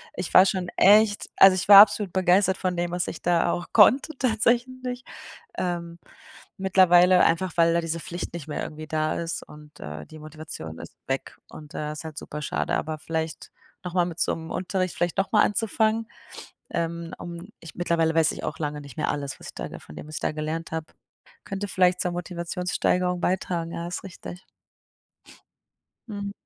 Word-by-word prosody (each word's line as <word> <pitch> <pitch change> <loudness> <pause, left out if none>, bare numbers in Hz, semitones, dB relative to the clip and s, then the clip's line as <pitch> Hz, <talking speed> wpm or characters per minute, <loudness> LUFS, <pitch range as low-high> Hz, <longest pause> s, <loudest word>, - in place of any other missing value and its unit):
Ich 180 -1 -5
war 185 - +8
schon 185 -2 -1
echt 205 +1 +5
also, 195 -1 +8
ich 185 - -2
war 200 0 +12
absolut 205 -3 +3
begeistert 190 +1 +3
von 185 -2 -2
dem, 175 0 -1
was 175 -1 -2
ich - - -8
da 175 0 +2
auch 175 - -3
konnte 260 +8 +5
tatsächlich. 250 +1 0 0.5
Ähm, 170 -1 -3 0.6
mittlerweile 185 -1 +5
einfach, 180 +2 +1
weil 165 0 +4
da 170 - +2
diese 165 0 -3
Pflicht 175 +2 -6
nicht 170 -4 -7
mehr 150 - -4
irgendwie 155 0 -7
da 155 0 -1
ist 170 0 -4
und 150 0 -15
äh, 75 0 -7
die 155 - -13
Motivation 155 - -9
ist - - -11
weg - - -3
und, 150 -1 -12
äh, 150 0 -4
ist 150 +1 -8
halt 155 -2 -8
super 150 - -6
schade, 150 - -1
aber 155 0 -3
vielleicht 160 +1 -4 0.3
nochmal 180 -1 0
mit 175 -1 -5
so - - +2
'm 160 0 -7
Unterricht 185 0 -2
vielleicht 175 0 -1
nochmal 205 +2 +3
anzufangen, 220 +1 0 0.6
ähm, 170 0 -3
um 175 +3 -8
ich 165 - -11
mittlerweile 170 -2 +1
weiß 165 -1 +3
ich - - -8
auch 150 - -4
lange 150 -1 -3
nicht 140 -4 -12
mehr - - -1
alles, 140 -2 -4
was - - -10
ich - - -10
da - - -7
von 75 - -14
dem 145 - -9
was 155 - -9
ich - - -7
da - - -1
gelernt 155 +2 -4
habe. 160 -1 -5 0.5
Könnte 195 +1 -4
vielleicht 180 -1 +2
zur 180 - -1
Motivationssteigerung 180 0 -1
beitragen, 175 -2 -1
ja, 170 0 -5
ist 180 - -5
richtig. 180 -1 -10 1.6
Mhm. 200 -2 -5
175 Hz, 185 wpm, -25 LUFS, 160-190 Hz, 1.6 s, war